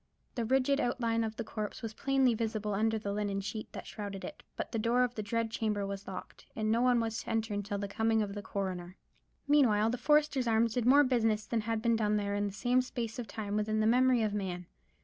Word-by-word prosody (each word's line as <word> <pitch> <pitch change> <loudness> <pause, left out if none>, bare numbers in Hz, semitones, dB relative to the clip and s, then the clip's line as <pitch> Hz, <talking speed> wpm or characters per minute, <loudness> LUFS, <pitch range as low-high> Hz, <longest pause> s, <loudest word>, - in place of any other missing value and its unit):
The 235 -3 -2
rigid 265 +3 +2
outline 230 -3 0
of 220 0 -3
the 230 - -3
corpse 215 +1 -5
was 225 -1 -4
plainly 270 0 +2
visible 215 -2 -2
under 220 +2 +1
the 205 -2 -3
linen 205 -1 -1
sheet 205 +2 -5
that - - -7
shrouded 200 -3 -6
it; - - -8
but - - -4
the 230 - -1
door 235 +3 +3
of 245 -1 -1
the 220 - -4
dread 225 +2 -1
chamber 215 -3 -1
was 195 0 -6
locked, 190 - -8
and 215 -1 0
no 230 +1 +3
one 250 -1 +4
was 225 -1 -2
to - - -9
enter 225 -1 -1
until 205 0 -2
the 200 0 -3
coming 220 +2 +1
of 200 -1 -5
the 205 - -5
coroner. 185 -2 -4 0.5
Meanwhile 225 -7 +4
the 245 - -3
Foresters' 295 -2 +3
Arms 225 0 +3
did 245 -1 0
more 285 +3 +7
business 225 -5 +1
than 230 -2 -1
had 225 0 -2
been 230 -1 +3
done 210 -1 +1
there 200 -1 -1
in 205 0 0
the - - -4
same 245 +5 +2
space 240 -2 -5
of 235 - -4
time 205 -1 -4
within 215 +1 0
the 215 - +2
memory 250 +1 +4
of 210 -1 0
man. 185 -3 -3
220 Hz, 240 wpm, -32 LUFS, 205-240 Hz, 0.5 s, more